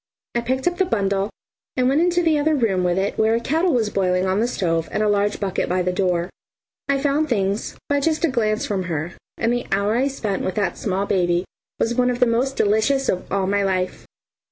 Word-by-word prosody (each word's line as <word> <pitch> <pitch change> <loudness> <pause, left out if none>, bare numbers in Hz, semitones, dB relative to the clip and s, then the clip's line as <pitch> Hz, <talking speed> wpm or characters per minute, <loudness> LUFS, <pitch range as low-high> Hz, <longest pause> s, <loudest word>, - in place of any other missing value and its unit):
I 235 - 0
picked 260 +2 -2
up 350 0 0
the 380 - +4
bundle 200 - 0 0.5
and 250 0 +3
went 280 +4 +3
into 350 0 +2
the 315 -3 +3
other 310 +1 +2
room 205 -9 +1
with 175 0 +1
it 195 +1 -1
where 220 +1 +3
a - - +1
kettle 320 +8 +1
was 225 -6 +1
boiling 185 -1 +1
on 190 +1 +1
the 235 - +2
stove 165 -8 -1
and 215 - 0
a - - +2
large 205 0 +1
bucket 195 -3 -1
by 180 0 +1
the 180 0 0
door. 180 -1 0 0.6
I 280 - +3
found 290 +2 +1
things 200 -3 -1
by 285 0 +2
just 315 +3 +1
a - - +1
glance 215 -4 0
from 190 -3 -2
her, 170 0 -3 0.2
and 230 +1 +1
the 245 - -2
hour 200 +2 +1
I 260 +3 +2
spent 215 -8 -3
with 185 - -2
that 205 -2 0
small 195 -1 -1
baby 175 -2 +1 0.3
was 230 - +1
one 250 +1 +2
of 245 -1 -2
the - - +5
most 245 +3 0
delicious 220 +7 +2
of 180 - -2
all 195 0 +1
my 200 +1 +1
life. 185 -2 -2
215 Hz, 230 wpm, -22 LUFS, 190-260 Hz, 0.6 s, the